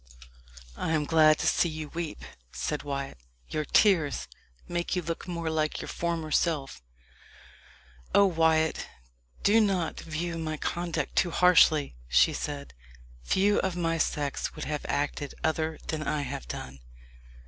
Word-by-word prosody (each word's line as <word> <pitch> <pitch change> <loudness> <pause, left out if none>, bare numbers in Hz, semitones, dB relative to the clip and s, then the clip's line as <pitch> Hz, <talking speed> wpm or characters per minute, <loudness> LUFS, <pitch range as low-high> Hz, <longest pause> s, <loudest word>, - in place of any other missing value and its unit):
"I 160 - -2
am 150 -2 +1
glad 155 -1 +5
to - - -3
see 170 +2 +3
you 155 -1 -6
weep," 165 -1 -5 0.3
said 150 - -3
Wyat; 140 - -5 0.3
"your 155 -1 -2
tears 165 -9 +3 0.4
make 175 +1 -2
you 180 - 0
look 165 +2 -4
more 170 -2 -3
like 155 -1 0
your - - -6
former 165 -2 -2
self." 150 - 0 1.3
"Oh, 200 - +7
Wyat, 160 -3 +2 0.6
do 220 +3 +5
not 190 -6 0
view 165 +1 -4
my 155 -1 -3
conduct 170 +2 -3
too 175 - +3
harshly!" 160 - +4
she 60 +1 +4
said. 145 -1 -5 0.5
"Few 200 - +2
of 190 -2 -1
my 165 -1 0
sex 145 -3 -1
would - - -5
have 150 0 -3
acted 145 -1 -2
other 160 0 0
than 155 -1 -1
I 150 -1 -1
have - - -6
done." 65 +2 -7
160 Hz, 145 wpm, -28 LUFS, 150-170 Hz, 1.3 s, Oh